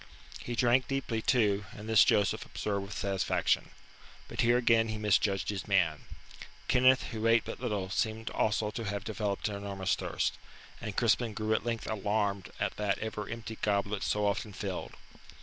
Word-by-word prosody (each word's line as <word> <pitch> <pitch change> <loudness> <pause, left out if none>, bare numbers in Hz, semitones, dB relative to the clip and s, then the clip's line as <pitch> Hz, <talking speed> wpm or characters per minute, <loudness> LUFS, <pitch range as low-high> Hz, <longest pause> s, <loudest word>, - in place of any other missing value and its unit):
He 120 - -5
drank 120 +2 +3
deeply 135 -5 -2
too, 105 -5 +2
and 105 +1 -9
this 110 -2 +7
Joseph 100 -2 +2
observed 100 -1 -3
with 105 - -7
satisfaction. 95 -1 0 0.6
But - - -2
here 120 +1 +4
again 115 -2 +4
he 110 0 -3
misjudged 105 -2 +1
his 100 -2 -3
man. 85 -7 +2 0.6
Kenneth, 130 +1 +5
who 110 -1 -1
ate 115 0 +4
but - - -6
little, 105 -6 -2
seemed 110 +1 -1
also 105 0 0
to 115 0 -5
have 100 0 -3
developed 105 -2 -2
an 105 - -3
enormous 100 -2 -2
thirst, - - -1 0.4
and 110 -4 -5
Crispin 115 -1 +2
grew 110 0 0
at 110 - 0
length 115 -1 -2
alarmed 105 -2 -1
at 105 -1 -1
that 105 -2 0
ever 105 -1 -5
empty 115 -1 -6
goblet 100 0 0
so 105 0 0
often 100 +1 -1
filled. - - -5
105 Hz, 170 wpm, -31 LUFS, 100-115 Hz, 0.6 s, this